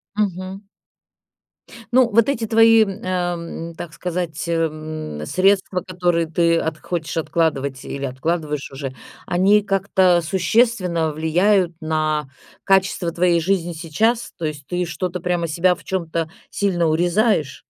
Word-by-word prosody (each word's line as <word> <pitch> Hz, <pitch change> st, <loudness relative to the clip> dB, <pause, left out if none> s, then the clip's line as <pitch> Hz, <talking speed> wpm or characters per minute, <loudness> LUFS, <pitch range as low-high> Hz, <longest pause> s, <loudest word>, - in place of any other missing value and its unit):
Мгм. 195 Hz, -1 st, -3 dB, 1.3 s
Ну, 255 Hz, -1 st, +5 dB
вот 230 Hz, +3 st, +4 dB
эти 235 Hz, -5 st, -1 dB
твои, 225 Hz, 0 st, +6 dB, 0.2 s
ам, 175 Hz, -2 st, -3 dB
так 165 Hz, -1 st, -8 dB
сказать, 175 Hz, -3 st, -3 dB
э, 170 Hz, -, 0 dB
м, 155 Hz, -, -3 dB
средства, 190 Hz, -, +2 dB
которые 175 Hz, -2 st, 0 dB
ты 165 Hz, +1 st, +2 dB
от 160 Hz, -1 st, -2 dB
хочешь 165 Hz, -3 st, -4 dB
откладывать, 140 Hz, -5 st, -1 dB
или 140 Hz, 0 st, -5 dB
откладываешь 150 Hz, +2 st, -2 dB
уже, 135 Hz, -1 st, -6 dB, 0.3 s
они 195 Hz, +4 st, +4 dB
как-то 190 Hz, -3 st, +2 dB
существенно 180 Hz, -2 st, +1 dB
влияют 175 Hz, +4 st, +2 dB
на 155 Hz, -2 st, -1 dB, 0.4 s
качество 190 Hz, -3 st, +2 dB
твоей 170 Hz, 0 st, +2 dB
жизни 175 Hz, 0 st, 0 dB
сейчас. 195 Hz, +9 st, 0 dB
То 165 Hz, -, -4 dB
есть 145 Hz, -2 st, -5 dB
ты 180 Hz, 0 st, -1 dB
что-то, 180 Hz, +1 st, -3 dB
прямо 175 Hz, -1 st, -1 dB
себя 175 Hz, +3 st, +2 dB
в -, -, -17 dB
чем-то 165 Hz, -3 st, -2 dB, 0.2 s
сильно 175 Hz, -5 st, 0 dB
урезаешь? 175 Hz, -, +1 dB
175 Hz, 130 wpm, -21 LUFS, 160-190 Hz, 1.3 s, твои